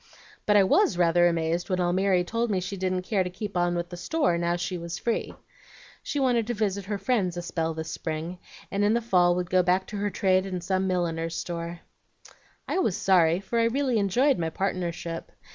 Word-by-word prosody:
But 210 0 +5
I 200 - +6
WAS 190 -1 +3
rather 175 0 +4
amazed 170 +1 -1
when 185 - +1
Almiry 180 +1 +2
told 230 +6 -1
me 195 -3 +1
she 190 +2 -4
didn't 185 -1 -1
care 195 0 +1
to 180 - -4
keep 200 +2 -6
on 175 0 +1
with 175 0 -3
the 175 - -8
store 290 - +1
now 170 0 0
she 175 +1 -3
was 170 0 -5
free. 235 - -2 0.7
She 290 - -3
wanted 245 -4 +2
to 240 - -2
visit 200 -2 -1
her 205 +1 -2
friends 195 -7 0
a 175 - -4
spell 165 -1 -2
this 160 0 -5
spring, 165 +3 -4 0.3
and 200 +1 0
in 210 +2 +3
the - - +3
fall 180 -6 +3
would 180 -1 -3
go 185 0 +5
back 180 +1 +1
to 210 - -5
her 205 +1 -1
trade 190 -1 +1
in 185 -1 -3
some 190 +2 -1
milliner's 165 -2 -1
store. 170 0 -5 0.9
"I - - 0
was 215 - +1
sorry, 175 -2 +3
for 230 +4 -1
I 230 - +3
really 255 -1 +1
enjoyed 245 +7 +2
my 165 -1 -1
partnership. 170 -2 -3
185 Hz, 210 wpm, -26 LUFS, 175-205 Hz, 0.9 s, I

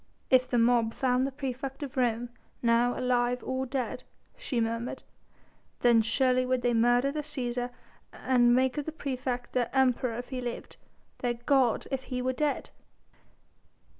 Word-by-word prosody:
"If 255 -1 +5
the 245 - +1
mob 230 -1 +3
found 255 0 +1
the - - -5
praefect 270 0 -5
of 270 -2 -7
Rome 240 -2 0 0.3
now 235 +1 +3
alive 250 -1 +1
or 260 0 -2
dead," 255 -1 -3 0.3
she 300 - -3
murmured, 230 +1 -2 0.8
"then 235 -2 +5
surely 255 +3 +2
would 255 -1 0
they 245 -1 +2
murder 245 +4 +3
the 300 +1 -3
Cæsar 250 -5 -3 0.4
and 240 -2 +3
make 260 +3 +2
of 290 - -4
the - - -2
praefect 255 -4 -4
their 245 -2 +1
Emperor 255 -3 +2
if 245 - -6
he 255 -2 -4
lived, 240 -1 -6 0.4
their 240 -1 -1
god 245 0 +2
if 265 -1 -3
he 250 -1 -3
were 255 +1 0
dead!" 295 +2 -1
250 Hz, 160 wpm, -29 LUFS, 240-265 Hz, 0.8 s, If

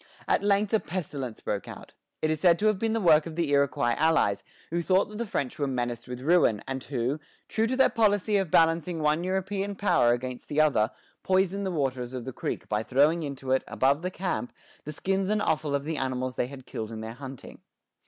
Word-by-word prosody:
At - - +2
length 200 +1 +2
a 220 - +5
pestilence 145 - -5
broke 100 - -3
out. - - -10 0.3
It 155 - +2
is 155 - -1
said 175 -2 +5
to 210 - -1
have 215 -3 +3
been 225 0 0
the 225 - +1
work 160 -5 +5
of 160 - -7
the 165 -4 -1
Iroquois 140 -4 +2
allies, 160 -11 +2 0.3
who 170 +1 0
thought 185 +4 +2
that 210 +1 -8
the 235 - -2
French 140 -9 -3
were 145 - +1
menaced 120 -2 -3
with 125 0 -6
ruin, 145 - +3
and 135 -1 -4
who, 130 +2 -1 0.3
true 225 +1 0
to 255 - -1
their 265 - +6
policy 210 -1 +2
of 190 -4 0
balancing 165 0 +2
one 150 +3 +2
European 195 +2 -2
power 190 -12 +3
against 125 +1 -3
the 150 - 0
other, 145 -9 +3 0.3
poisoned 190 +1 +1
the - - -2
waters 130 -5 -2
of 125 - -5
the 130 - -5
creek - - -4
by 105 0 0
throwing 145 +8 +3
into 135 -3 -5
it, 130 - +3
above 140 +3 +2
the 180 - -2
camp, 185 -9 -3 0.3
the 150 - -4
skins 195 +5 -1
and 215 0 +2
offal 155 -5 0
of 140 - -1
the 155 +1 -3
animals 130 -1 -2
they 120 - 0
had 135 -1 -11
killed 110 -1 -5
in 110 -1 -6
their 110 +1 -6
hunting. 135 0 -10
155 Hz, 220 wpm, -27 LUFS, 130-190 Hz, 0.3 s, their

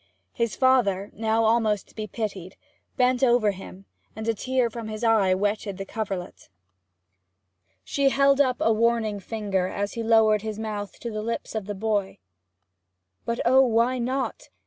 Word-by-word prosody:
His 235 -2 -1
father, 215 -7 +2
now 220 +1 +1
almost 220 -2 +2
to - - -22
be 215 -1 -5
pitied, 200 -4 -5 0.4
bent 250 0 +2
over 240 -4 +4
him, 195 0 -11 0.3
and 220 +1 -6
a 230 - +2
tear 255 +3 0
from 230 -1 -7
his 215 +1 -6
eye 210 -5 +4
wetted 205 0 -2
the 195 - -5
coverlet. 195 - -5 1.3
She 280 - +1
held 275 +1 +4
up 255 -3 +2
a 225 - +3
warning 225 -2 +1
finger 200 -3 -2
as 200 +2 -3
he 230 - -4
lowered 220 -2 +4
his 215 -1 -5
mouth 210 -2 -5
to 235 - -4
the 215 0 -4
lips 230 +2 -4
of 215 -3 -4
the 205 - -4
boy. 205 -1 -1 1.1
'But 235 0 -2
oh, 260 +2 +6
why 245 0 +2
not?' 260 - -3
220 Hz, 165 wpm, -25 LUFS, 205-235 Hz, 1.3 s, oh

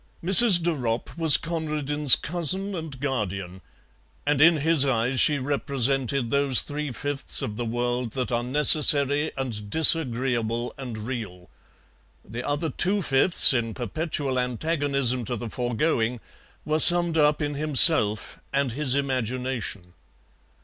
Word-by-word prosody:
Mrs. 190 0 +8
De 170 - -1
Ropp 120 -6 -6
was 160 -3 +4
Conradin's 150 -4 +1
cousin 180 +5 +2
and 160 -7 -9
guardian, 100 -9 -6 0.6
and 145 -1 -2
in 165 +1 +3
his 155 -1 +2
eyes 130 -1 -2
she 150 - +2
represented 135 -2 -3
those 140 -2 0
three 150 -1 -7
fifths 145 +3 -4
of 105 - -7
the 120 +2 -7
world 120 0 -5
that 130 -1 -6
are 120 0 -3
necessary 145 +2 +3
and 110 -6 -7
disagreeable 125 -6 +1
and 125 -5 -10
real; 105 -6 -10 0.8
the 115 +4 -8
other 145 +3 -5
two 195 +7 0
fifths, 135 +3 +3
in 115 -3 -4
perpetual 140 0 -5
antagonism 135 -1 -2
to 120 +2 -6
the 115 -1 -9
foregoing, 120 -1 -4 0.5
were 155 +1 -3
summed 175 0 +5
up 150 0 0
in 145 -1 -5
himself 145 - +3
and 140 -2 -3
his 135 +1 -2
imagination. 125 -8 -6
135 Hz, 130 wpm, -22 LUFS, 120-150 Hz, 0.8 s, Mrs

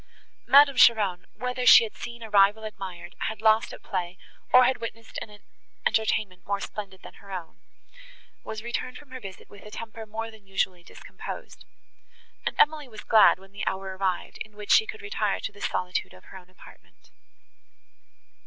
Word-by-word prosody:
Madame 280 -1 +7
Cheron, 205 -8 +4
whether 250 0 -3
she 235 -1 +9
had 220 - -6
seen 235 -1 -8
a 220 - -8
rival 205 +2 +5
admired, 195 -4 -8
had 220 - -5
lost 220 +1 +3
at - - -11
play, 175 +1 -3 0.3
or 255 0 +8
had 250 -1 +1
witnessed 230 0 -7
an 210 -1 -10 0.4
entertainment 210 -4 0
more 200 0 -2
splendid 200 -2 -7
than - - -11
her 200 - -13
own, 175 -4 -7 0.8
was 220 0 -6
returned 240 +2 -4
from 290 -3 -16
her 260 - -7
visit 195 -5 -10
with 205 - -15
a 210 - -11
temper 225 0 -8
more 225 +1 -5
than 215 -3 -18
usually 190 -2 -1
discomposed; - - -10 0.8
and - - -2
Emily 300 -2 +3
was 215 -3 -11
glad, 220 -3 +6
when 195 +1 -18
the 200 0 -7
hour 190 0 -3
arrived, 190 -2 -2
in 215 -1 -21
which 210 -1 -4
she 440 - +6
could 435 0 -8
retire 420 - -1
to - - -4
the - - -16
solitude 180 - -2
of 90 - -17
her - - -12
own 180 0 -20
apartment. 185 - -19
215 Hz, 180 wpm, -26 LUFS, 195-235 Hz, 0.8 s, she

